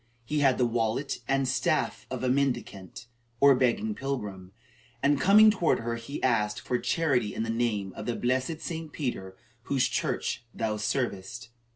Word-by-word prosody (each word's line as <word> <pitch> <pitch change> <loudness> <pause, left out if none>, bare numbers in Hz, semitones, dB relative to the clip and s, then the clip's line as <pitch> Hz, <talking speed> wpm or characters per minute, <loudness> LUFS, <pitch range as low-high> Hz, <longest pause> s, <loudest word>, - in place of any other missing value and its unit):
He 150 +5 -1
had 135 -3 +3
the 125 - +3
wallet 115 +3 -1
and 135 -1 +1
staff 130 0 0
of - - -4
a - - +1
mendicant, 125 -7 -2 0.3
or 140 0 +7
begging 135 - +1
pilgrim, 105 - -5 0.5
and, 145 0 +3
coming 215 +3 +7
toward 180 - +1
her, 115 +1 -2
he 115 +5 -7
asked 105 -4 +1
for 125 - -2
"charity 130 -10 0
in - - -1
the 115 - -2
name 110 -5 -1
of 105 - -7
the 120 - -1
blessed 130 +6 -1
St. 160 -2 -5
Peter, 95 -11 -4 0.3
whose 135 -2 +1
church - - -2
thou 110 -1 -1
servest." 115 0 -3
125 Hz, 165 wpm, -28 LUFS, 110-140 Hz, 0.5 s, or